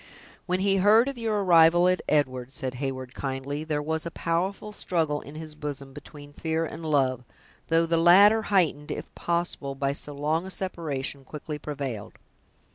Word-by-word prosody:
"When 180 +1 0
he 195 0 +3
heard 215 +6 +5
of 275 -3 -4
your 215 -3 0
arrival 175 0 +6
at 185 0 +2
Edward," 130 -3 0
said 130 -4 -4
Heyward, 130 -1 -4
kindly, 135 +2 -4
"there 150 -2 -2
was 160 +1 -2
a 170 - -3
powerful 185 +6 -2
struggle 160 -7 -1
in 145 - -11
his 155 -1 -7
bosom 145 -3 -6
between 145 0 -12
fear 160 +2 -1
and 160 +1 -8
love; 135 -5 +1 0.4
though 165 +1 +3
the 165 0 +1
latter, 200 +6 +7
heightened, 160 -7 +2
if - - -6
possible, 170 -5 -2
by 140 0 0
so 145 0 -5
long 155 +5 -1
a - - -6
separation, 150 -8 -3
quickly 150 +2 -7
prevailed. 135 -8 -5
155 Hz, 170 wpm, -26 LUFS, 140-175 Hz, 0.4 s, latter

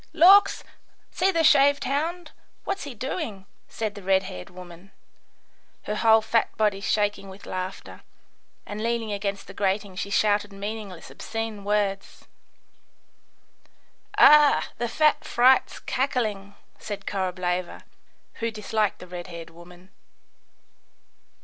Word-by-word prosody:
"Lawks! 370 +5 +6 0.5
see 375 - +1
the 335 -3 +1
shaved 285 -1 +5
hound, 330 +6 -2 0.3
what 395 - -3
he's 275 -6 -8
doing," 250 - -5 0.2
said 215 -2 -4
the 205 - -10
red 190 0 +2
haired 90 - -8
woman, 180 +1 -13 0.9
her 210 - -3
whole 220 0 +4
fat 225 +1 0
body 210 -2 +1
shaking 205 -1 -1
with 190 +1 -12
laughter; 185 +1 -6 0.6
and 205 +1 -6
leaning 230 -1 -1
against 200 -1 -3
the - - -11
grating 195 0 -1
she 200 - -4
shouted 205 0 +1
meaning 205 +1 -6
less 180 -3 -12
obscene 225 -2 -5
words. 200 -1 -2 1.9
"Ugh, 300 -1 +7 0.2
the 240 0 -1
fat 305 +5 +2
fright's 255 +2 +3
cackling," 215 -7 -2 0.2
said 200 -1 -7
Korableva, 180 -2 -3 0.6
who 230 - -1
disliked 215 -1 -1
the - - -11
red 175 -1 -7
haired 170 -2 -9
woman. 175 +2 -16
205 Hz, 125 wpm, -25 LUFS, 195-235 Hz, 1.9 s, Ugh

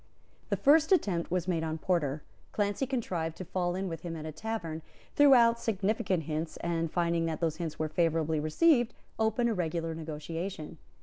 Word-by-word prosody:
The - - +1
first 310 +4 +5
attempt 190 - +2
was 180 0 -1
made 170 -3 0
on 160 0 -2
Porter. 155 -4 -1 0.3
Clancy 205 +5 0
contrived 180 - -2
to 185 - -6
fall 175 0 -1
in 190 +1 -2
with 165 -2 -5
him 170 -2 -5
at 155 -1 -6
a 155 - -4
tavern, 165 -2 -4 0.3
threw 285 -2 +7
out 235 -1 +5
significant 200 -4 0
hints, 155 +1 -3
and, 165 -1 -2
finding 170 -1 +1
that 160 -1 -3
those 160 -2 -1
hints 165 -3 -4
were 155 - -1
favourably 160 -1 +1
received, 240 - +3 0.2
opened 225 +2 +2
a - - +1
regular 165 -3 -2
negotiation. 160 +1 -6
170 Hz, 180 wpm, -30 LUFS, 160-210 Hz, 0.3 s, threw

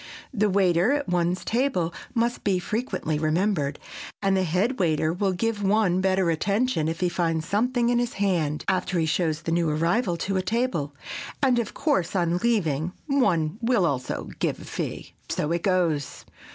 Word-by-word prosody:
The 210 -3 +2
waiter 190 +3 +3
at 290 -1 -1
one's 175 +1 0
table 230 -9 0 0.2
must 235 +1 0
be 195 -3 +2
frequently 180 - -2
remembered, 155 -2 0 0.4
and 195 -1 +2
the 190 - +2
head 185 +9 0
waiter 160 -2 +1
will 190 +2 0
give 215 +3 -1
one 195 -2 +2
better 190 -2 +2
attention 200 +1 0
if 165 +2 -3
he 180 - +3
finds 165 -2 -1
something 240 +3 +1
in 240 0 +2
his 240 0 -1
hand 170 -7 0
after 185 -1 0
he 165 - +2
shows 160 0 0
the 165 - -2
new 170 -1 +2
arrival 170 +5 +1
to 195 +3 -1
a - - +1
table, 185 - -1 0.5
and, 255 -3 +4
of 230 - -4
course, 280 - 0
on 175 -1 +1
leaving, 180 -7 0
one 205 - +1
will 230 -5 +2
also 130 -6 -2
give - - -1
a - - -10
fee. - - -5 0.2
So 150 - -1
it 170 0 0
goes! 170 -7 0
185 Hz, 175 wpm, -25 LUFS, 165-220 Hz, 0.5 s, and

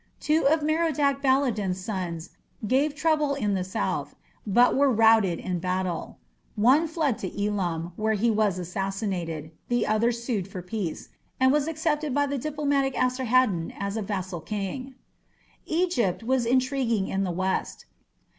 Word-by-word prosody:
Two 305 -1 +2
of 310 +1 +3
Merodach 300 -3 +1
Baladan's 245 -9 +1
sons 180 -4 -4 0.3
gave 280 +6 +1
trouble 300 -2 +1
in 210 -7 0
the 185 -2 0
south, 185 - -3 0.3
but 240 +5 +4
were 280 0 +4
routed 220 -6 +4
in 180 -2 -3
battle. 185 -1 -3 0.4
One 260 +10 +4
fled 310 -7 -1
to 200 +2 -3
Elam, 175 -5 -2
where 220 0 +1
he 225 +3 +2
was 210 -4 +1
assassinated; 180 -4 -3 0.2
the 240 -1 +1
other 215 +3 +2
sued 235 -5 -3
for 185 -2 -7
peace, 180 -3 -4 0.3
and 260 0 +5
was 295 +1 +2
accepted 310 -3 -1
by 285 0 +3
the 280 -1 -2
diplomatic 280 -1 0
Esarhaddon 255 -8 +1
as 200 +1 -3
a 220 - -1
vassal 185 -4 -4
king. 215 +8 -5 0.7
Egypt 315 - 0
was 250 0 +1
intriguing 255 -5 +1
in 195 0 -1
the 190 - -1
west. 185 +2 -2
225 Hz, 145 wpm, -26 LUFS, 190-275 Hz, 0.7 s, and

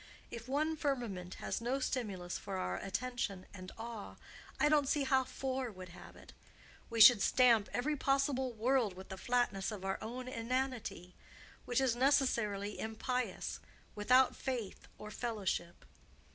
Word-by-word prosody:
If 235 0 -7
one 305 +4 0
firmament 240 - -2
has - - -3
no 245 +3 0
stimulus 200 -9 -3
for 195 -1 -5
our 90 - -2
attention 195 - -3
and 185 -1 -9
awe, 225 -2 -7 0.4
I - - +5
don't 295 -2 +4
see 295 - +2
how 265 -1 +3
four 260 -1 -3
would 185 -2 -10
have 175 - -12
it. - - -14 0.6
We 230 -1 -3
should 225 -1 +10
stamp 235 -4 +4
every 295 +5 0
possible 275 -2 +1
world 230 -3 +1
with 190 +1 -10
the 190 - -5
flatness 240 -4 0
of 195 -3 -6
our 195 0 -1
own 250 +3 -5
inanity—which 245 -3 -4
is 260 -3 +2
necessarily 235 -7 +1
impious, 250 +3 -3 0.3
without 250 +5 +4
faith 245 -7 -4
or 210 0 -8
fellowship. 205 -7 -3
235 Hz, 145 wpm, -35 LUFS, 200-260 Hz, 0.6 s, should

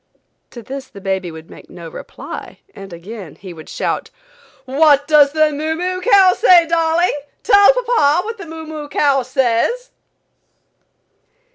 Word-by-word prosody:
To 235 - -11
this 270 +3 -8
the 200 - -13
baby 190 -2 -3
would 160 0 -11
make - - -15
no 170 -2 -10
reply - - -10
and 195 -1 -11
again 180 0 -10
he 185 -2 -11
would 160 -2 -13
shout: - - -3 0.6
"What 285 +1 +3
does 295 -2 +5
the 310 -1 +2
moo 310 +2 -3
moo 365 +2 -3
cow 390 -3 +5
say, 360 -7 +5
darling; 330 +1 +1 0.3
tell 405 -1 +6
papa 450 -10 +1
what 450 0 -6
the 390 - -9
moo 320 0 -9
moo 305 -2 -8
cow 280 -2 +1
says?" 260 - -1
300 Hz, 150 wpm, -17 LUFS, 230-360 Hz, 0.6 s, tell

